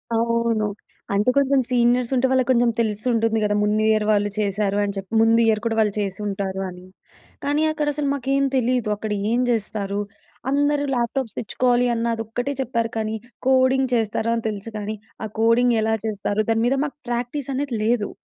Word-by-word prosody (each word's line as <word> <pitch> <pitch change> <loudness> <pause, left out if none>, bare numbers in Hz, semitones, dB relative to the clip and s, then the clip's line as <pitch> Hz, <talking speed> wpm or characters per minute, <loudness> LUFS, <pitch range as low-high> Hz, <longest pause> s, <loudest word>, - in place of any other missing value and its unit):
అవును. 230 -1 +1 0.5
అంటే 210 +5 +2
కొంచెం 275 -1 +3
సీనియర్స్ 245 0 +2
ఉంటే, 255 +1 +2
వాళ్ళకి 260 -1 +2
కొంచెం 240 -1 +3
తెలిసి 215 0 -1
ఉంటుంది 225 -1 +1
కదా! 205 0 +1
ముందు 210 +1 +1
ఇయర్ 215 -1 +2
వాళ్ళు 205 0 +2
చేశారు 200 0 0
అని 200 -1 -2
చెప్పి. 195 +2 -7
ముందు 225 +1 +4
ఇయర్ 220 -1 +2
కూడా 225 -1 0
వాళ్ళు 210 -2 +2
చేసి 195 -1 -3
ఉంటారు 195 -1 -3
అని. 180 0 -11 0.6
కానీ 295 +2 +1
అక్కడ 300 -1 -2
అసలు 290 -1 -2
మాకేం 275 +1 0
తెలీదు. 245 -2 +1
అక్కడ 215 +1 -5 0.2
ఏం 240 - +2
చేస్తారు, 205 -3 -1 0.5
"అందరూ 290 0 +2
ల్యాప్‌టాప్స్ 240 0 -2
తెచ్చుకోవాలి, 245 +2 +1
అన్న 230 0 -1
అది 225 - -4
ఒక్కటే 245 +5 -2
చెప్పారు" 230 -2 -1
కాని, 220 0 -1 0.3
కోడింగ్ 260 0 +3
చేస్తారు 225 0 0
అని 230 - -4
తెలుసు 215 +2 -6
కానీ, 210 +1 -4 0.3
ఆ - - -3
కోడింగ్ 230 +1 +4
ఎలా 220 0 +1
చేస్తారు? 210 0 -1
దాని 225 +1 +1
మీద 270 +2 +1
మాకు 290 - -7
ప్రాక్టీస్ 245 +3 -3
అనేది 270 -4 -2
లేదు. 225 -2 +1
230 Hz, 180 wpm, -22 LUFS, 215-250 Hz, 0.6 s, ముందు